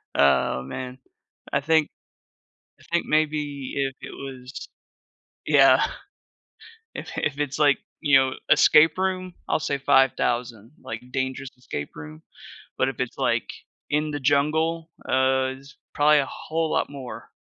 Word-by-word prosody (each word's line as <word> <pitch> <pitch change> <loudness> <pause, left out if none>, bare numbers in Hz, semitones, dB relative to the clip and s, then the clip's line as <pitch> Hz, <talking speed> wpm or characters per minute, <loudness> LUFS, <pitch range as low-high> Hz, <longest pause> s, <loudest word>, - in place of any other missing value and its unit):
Oh, 65 -2 +3
man. 125 - -7 0.5
I 140 - +1
think 160 +1 +2 0.9
I - - -19
think 170 - +1
maybe 150 -3 -1
if 135 -1 -1
it - - -8
was 130 -1 -8 0.8
Yeah, - - +6 1.1
if - - -6
i - - -1
if 145 0 -2
it's, 145 0 -2
like, 145 -3 +5 0.2
you 145 -3 +5
know, 130 0 +2 0.2
escape 150 +1 +6
room, 185 -1 -2
I'll - - +1
say 145 -2 -1
5,000. 120 -4 +1
Like, 110 +1 -6
dangerous 130 0 -3
escape 95 -12 -6
room, 75 +1 -10 0.5
but 130 - +1
if 135 - -6
it's, 130 -2 -3
like, - - 0 0.4
in 150 +1 0
the 145 -1 -4
jungle, 160 +4 +1 0.2
uh, 130 0 +2
it's 140 +1 -16 0.2
probably 150 0 +5
a 140 - +1
whole 160 0 -3
lot - - 0
more. 135 -3 -9
140 Hz, 140 wpm, -24 LUFS, 130-150 Hz, 1.1 s, Yeah